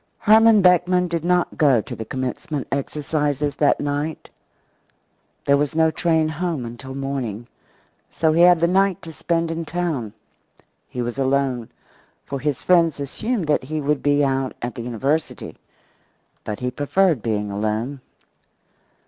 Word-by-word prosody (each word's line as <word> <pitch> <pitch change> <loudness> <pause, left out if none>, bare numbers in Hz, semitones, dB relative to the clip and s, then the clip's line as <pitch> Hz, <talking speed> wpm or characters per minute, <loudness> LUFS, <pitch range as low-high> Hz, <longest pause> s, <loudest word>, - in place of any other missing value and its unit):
Herman 220 -1 +5
Beckman 180 0 +4
did 170 -2 -3
not 180 0 0
go 140 -6 +5
to - - -6
the 110 - -6
commencement 130 +4 -4
exercises 145 0 -2
that 145 - +3
night. 145 +2 -3 1.1
There 140 0 +4
was 145 +2 -1
no 160 0 +3
train 160 -1 +1
home 160 -4 -3
until 125 +3 -8
morning, 135 -5 -4 0.6
so 160 -1 +1
he 165 - +3
had 175 -1 +7
the 170 - +4
night 190 0 +2
to 165 -1 -9
spend 165 0 -1
in 165 0 -3
town. 160 -10 -3 0.8
He 125 - -3
was 120 +3 -4
alone, 135 -3 0 0.6
for 140 - -4
his 145 -1 -2
friends 170 -4 +3
assumed 205 - -2
that 150 -3 +1
he 155 +3 -3
would 150 0 0
be 145 0 +3
out 135 -1 -1
at 120 0 -4
the 120 - -7
university. 135 +7 -2 0.8
But 105 +2 -5
he 125 0 -1
preferred 155 - +1
being 105 -2 -2
alone. 110 +7 -2
145 Hz, 150 wpm, -22 LUFS, 130-165 Hz, 1.1 s, had